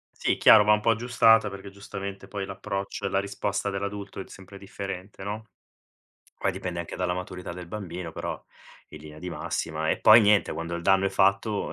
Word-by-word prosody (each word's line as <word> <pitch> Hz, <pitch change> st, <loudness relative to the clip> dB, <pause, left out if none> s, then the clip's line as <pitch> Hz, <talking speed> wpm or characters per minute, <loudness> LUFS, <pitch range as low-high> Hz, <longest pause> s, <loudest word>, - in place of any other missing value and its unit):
Sì, -, -, 0 dB
chiaro, 105 Hz, -, +8 dB
va 105 Hz, +1 st, +5 dB
un 105 Hz, -, +3 dB
po' 115 Hz, -, +1 dB
aggiustata 115 Hz, -2 st, +4 dB
perché 100 Hz, 0 st, -9 dB
giustamente 100 Hz, -1 st, -8 dB
poi 100 Hz, 0 st, -4 dB
l'approccio 95 Hz, 0 st, -5 dB
e -, -, 0 dB
la 95 Hz, -, +1 dB
risposta 100 Hz, +1 st, -2 dB
dell'adulto 100 Hz, 0 st, -5 dB
è -, -, -4 dB
d -, -, -20 dB
sempre 95 Hz, +1 st, -12 dB
differente, 100 Hz, 0 st, -7 dB
no, 105 Hz, +2 st, -5 dB, 0.9 s
poi 100 Hz, -, +1 dB
dipende 90 Hz, -2 st, -4 dB
anche 85 Hz, -, -7 dB
dalla 90 Hz, -1 st, -1 dB
maturità 90 Hz, -1 st, -6 dB
del 90 Hz, -1 st, -9 dB
bambino, 90 Hz, -4 st, -6 dB
però -, -, -5 dB, 0.5 s
in 75 Hz, -, -10 dB
linea 75 Hz, 0 st, -11 dB
di 90 Hz, -, -5 dB
massima. 80 Hz, -2 st, -3 dB
E -, -, -1 dB
poi 110 Hz, +2 st, +9 dB
niente, 105 Hz, -1 st, +3 dB
quando 85 Hz, +1 st, -4 dB
il 85 Hz, -, -4 dB
danno 95 Hz, +1 st, +4 dB
è -, -, +2 dB
fatto, 100 Hz, +2 st, +1 dB
100 Hz, 200 wpm, -26 LUFS, 90-100 Hz, 0.9 s, poi